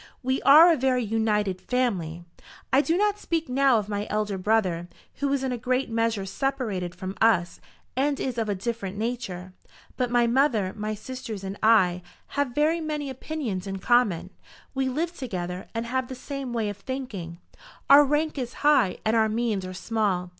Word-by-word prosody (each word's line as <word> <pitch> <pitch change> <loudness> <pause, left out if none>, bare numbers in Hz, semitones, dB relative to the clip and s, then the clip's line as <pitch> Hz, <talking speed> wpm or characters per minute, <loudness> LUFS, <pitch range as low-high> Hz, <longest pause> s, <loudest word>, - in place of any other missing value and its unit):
We 260 +1 0
are 325 +5 +8
a - - 0
very 255 -1 +1
united 210 -4 0
family. 185 -8 -1 0.5
I 270 - +6
do 330 +3 +1
not 415 +1 +1
speak 330 -4 -2
now 265 -1 +3
of 210 -2 -2
my 205 0 -3
elder 210 -1 -1
brother, 185 -4 +1 0.3
who 280 -1 -1
is 275 -1 0
in 260 - -1
a 245 - -3
great 255 +1 -1
measure 225 -3 0
separated 205 -7 -2
from 185 +2 -6
us 195 -6 +2 0.3
and 280 +2 +1
is 250 -3 -2
of 220 -2 -1
a 205 - 0
different 200 -1 -4
nature. 205 -6 -4 0.4
But 250 -2 0
my 240 0 +3
mother, 235 -6 +2
my 215 0 -3
sisters, 225 -2 -7
and 195 0 -4
I, 190 -5 +4 0.3
have 285 -4 -2
very 315 +3 +2
many 300 -3 -3
opinions 250 -9 -4
in 195 0 -3
common. 195 -5 +2 0.4
We 265 -1 0
live 330 +6 -2
together, 180 - -5
and 230 +1 -2
have 260 +2 -1
the 260 - -7
same 275 0 -6
way 225 -3 -1
of 205 - -6
thinking. 205 -9 -6 0.5
Our 285 +1 +9
rank 295 +1 0
is 245 -1 -4
high, 265 -10 +4
and 220 +1 +2
our 220 -1 +3
means 215 -4 -1
are 185 - -7
small. 195 -4 -1
230 Hz, 180 wpm, -26 LUFS, 195-265 Hz, 0.5 s, Our